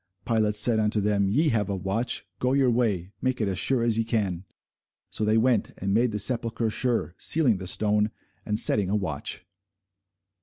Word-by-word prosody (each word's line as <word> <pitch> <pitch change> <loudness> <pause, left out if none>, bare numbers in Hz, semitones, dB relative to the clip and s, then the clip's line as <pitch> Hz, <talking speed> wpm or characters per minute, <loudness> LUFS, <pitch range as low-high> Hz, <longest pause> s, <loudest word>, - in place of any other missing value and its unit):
Pilate 110 -3 0
said 110 +1 +4
unto 105 0 +1
them, 100 -1 +1
Ye 150 +10 +2
have 105 -5 -1
a 100 - -2
watch: 95 +6 -1
go 125 +1 0
your 135 -3 +2
way, 105 -7 -1
make 130 -1 -1
it 110 - 0
as 95 -1 -1
sure 130 -3 +1
as 115 -1 +1
ye - - +2
can. 100 -6 -2 0.7
So 110 - -3
they 110 +1 +2
went, 115 -1 +1
and 100 +1 -2
made 115 +2 +2
the 105 - -3
sepulchre 115 0 0
sure, 120 -6 -1
sealing 135 -10 +3
the 95 0 -8
stone, 105 +2 +1 0.3
and 105 0 -2
setting 100 -3 +2
a 105 - 0
watch. 90 -3 -4
110 Hz, 190 wpm, -25 LUFS, 100-120 Hz, 0.7 s, said